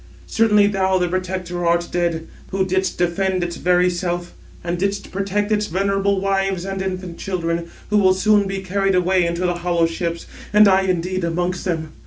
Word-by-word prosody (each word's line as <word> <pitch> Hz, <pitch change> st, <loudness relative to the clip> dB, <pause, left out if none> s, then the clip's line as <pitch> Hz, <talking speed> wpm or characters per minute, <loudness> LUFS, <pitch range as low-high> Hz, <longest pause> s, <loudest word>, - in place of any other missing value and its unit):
Certainly 210 Hz, -2 st, +3 dB
thou, 190 Hz, -1 st, +1 dB
the 180 Hz, -1 st, +1 dB
protector, 180 Hz, -1 st, -3 dB
art 170 Hz, 0 st, +2 dB
dead, 170 Hz, -2 st, -1 dB, 0.2 s
who 190 Hz, 0 st, 0 dB
didst 190 Hz, 0 st, -1 dB
defend 185 Hz, +1 st, 0 dB
its 170 Hz, -1 st, -4 dB
very 180 Hz, 0 st, +3 dB
self, 175 Hz, -1 st, -2 dB, 0.3 s
and 175 Hz, 0 st, -2 dB
didst 200 Hz, +1 st, -2 dB
protect 200 Hz, +2 st, -1 dB
its 210 Hz, 0 st, +1 dB
venerable 195 Hz, +2 st, 0 dB
wives 195 Hz, -1 st, 0 dB
and 195 Hz, 0 st, -3 dB
infant 185 Hz, -2 st, -5 dB
children; 170 Hz, -3 st, -2 dB, 0.2 s
who 210 Hz, -, +4 dB
will 185 Hz, -2 st, +4 dB
soon 205 Hz, +1 st, +3 dB
be 195 Hz, 0 st, -4 dB
carried 195 Hz, 0 st, 0 dB
away 180 Hz, 0 st, +2 dB
in 170 Hz, -, -2 dB
the 175 Hz, 0 st, 0 dB
hollow 175 Hz, -1 st, +1 dB
ships, 170 Hz, 0 st, -3 dB, 0.3 s
and 210 Hz, 0 st, +7 dB
I 190 Hz, 0 st, +5 dB
indeed 185 Hz, 0 st, -1 dB
amongst 175 Hz, +2 st, -2 dB
them. 160 Hz, -3 st, -2 dB
185 Hz, 180 wpm, -20 LUFS, 175-195 Hz, 0.3 s, and